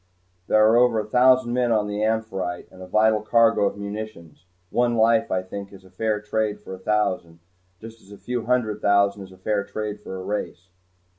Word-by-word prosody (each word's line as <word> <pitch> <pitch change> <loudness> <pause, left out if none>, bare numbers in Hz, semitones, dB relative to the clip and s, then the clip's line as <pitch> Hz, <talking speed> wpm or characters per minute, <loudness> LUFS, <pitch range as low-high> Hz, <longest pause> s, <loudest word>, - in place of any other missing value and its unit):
"There 110 0 +4
are 115 +2 +4
over 120 -2 +4
a 105 - -3
thousand 125 +1 +4
men 125 -1 +1
on 105 -2 +2
the 105 0 -3
'Amphitrite,' 100 -5 -2
and 95 - -14
a 90 - -9
vital 110 +2 +3
cargo 115 -1 +3
of - - -5
munitions. 100 -5 -8 0.2
One 120 -1 +1
life, 115 0 +3
I 90 0 -1
think, 100 +1 -8
is 95 -1 -14
fair 110 +1 0
trade 105 0 -2
for 105 - -10
a 95 - -8
thousand, 95 -5 -1 0.4
just 115 0 -12
as 100 - -19
a 100 - -11
few 120 0 -4
hundred 110 -4 0
thousand 100 0 +2
is 95 - -16
fair 105 -1 0
trade 105 0 -5
for 95 - -8
a - - -7
race." 95 -2 -5
105 Hz, 200 wpm, -23 LUFS, 100-110 Hz, 0.4 s, There